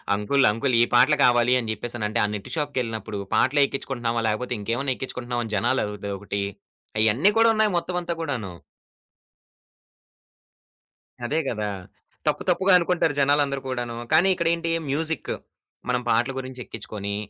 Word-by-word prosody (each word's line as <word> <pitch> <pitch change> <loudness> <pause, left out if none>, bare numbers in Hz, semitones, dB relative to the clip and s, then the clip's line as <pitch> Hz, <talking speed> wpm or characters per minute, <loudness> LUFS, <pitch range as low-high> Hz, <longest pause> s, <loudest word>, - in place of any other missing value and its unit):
"Uncle 125 +6 +2
uncle 120 +4 0
ఈ - - +7
పాటలు 130 +5 +5
కావాలి" 120 0 +4
అని 115 -2 -4
జెప్పేసనంటే, 115 0 -3
ఆ - - +3
నెట్ 100 - -7
షాప్‌కెళ్ళినప్పుడు 115 -8 -3 0.2
"పాటలెక్కించుకుంటున్నావా, 130 -4 +1
లేకపోతే 125 +3 -2
ఇంకేమైనా 120 +6 -1
ఎక్కించుకుంటున్నావా?" 120 -2 -4
అని 110 - -7
జనాలు 120 +5 +1
అదొకటి 100 -1 -4 0.6
అయన్ని 110 - +4
కూడున్నాయి 220 -2 +4
మొత్తమంతా 175 0 -2
కూడాను. 120 - -3 2.7
అదే 150 +6 0
గదా! 105 -3 -2 0.6
తప్పు - - +1
తప్పుగా 190 +1 +3
అనుకుంటారు 170 -3 +1
జనాలందరు 140 -1 +2
కూడాను. 120 -2 -3 0.2
కానీ 170 +4 +5
ఇక్కడేంటి, 170 -1 0 0.2
మ్యూజిక్. 160 +3 -1 0.6
మనం 125 0 +1
పాటలు 120 +4 +2
గురించెక్కించుకొని, 110 -6 -6
125 Hz, 120 wpm, -24 LUFS, 110-145 Hz, 2.7 s, ఈ